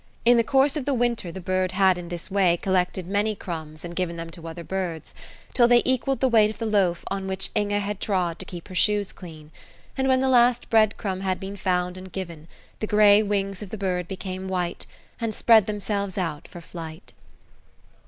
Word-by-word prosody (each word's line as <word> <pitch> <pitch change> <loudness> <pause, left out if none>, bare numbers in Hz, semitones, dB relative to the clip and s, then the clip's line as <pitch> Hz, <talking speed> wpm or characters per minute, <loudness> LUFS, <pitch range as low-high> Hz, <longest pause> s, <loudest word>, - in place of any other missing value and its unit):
In 240 +1 +7
the 230 - +4
course 270 +4 +3
of 295 -4 -3
the 280 -1 +1
winter 235 -7 0
the 190 - -7
bird 185 0 -1
had 190 -1 +4
in 175 -1 -7
this 175 +2 -6
way 185 -3 +3
collected 185 0 0
many 205 +3 0
crumbs 160 -4 -7
and 170 0 -7
given 175 -2 -2
them 165 0 -7
to 165 -1 -9
other 165 +1 -7
birds, 175 -4 -4 0.4
till 240 -2 +5
they 240 0 +5
equalled 260 +1 0
the 265 - +4
weight 220 -4 +5
of 215 - -7
the 225 - -3
loaf 195 -5 +1
on 195 -1 -3
which 190 0 -1
Inge 205 -1 0
had 205 -1 -1
trod 180 -5 -1
to - - -5
keep 175 -2 -9
her - - -8
shoes 205 +2 +2
clean; 155 -4 -12 0.4
and 265 0 0
when 260 -1 +4
the 265 - +1
last 245 -1 +3
bread 215 -2 +4
crumb 190 -3 -3
had 190 -1 -1
been 195 +1 -6
found 180 -2 -1
and 185 0 -10
given, 170 -4 -7 0.3
the 215 - -2
gray 210 0 +6
wings 195 -2 -1
of 205 - -7
the 220 - -6
bird 180 -3 -2
became 190 0 -5
white, 180 -2 -3 0.3
and 230 -2 -2
spread 225 -4 +5
themselves 205 -2 -3
out 165 -6 -3
for 175 - -11
flight. 165 0 -9
190 Hz, 210 wpm, -25 LUFS, 180-215 Hz, 0.4 s, In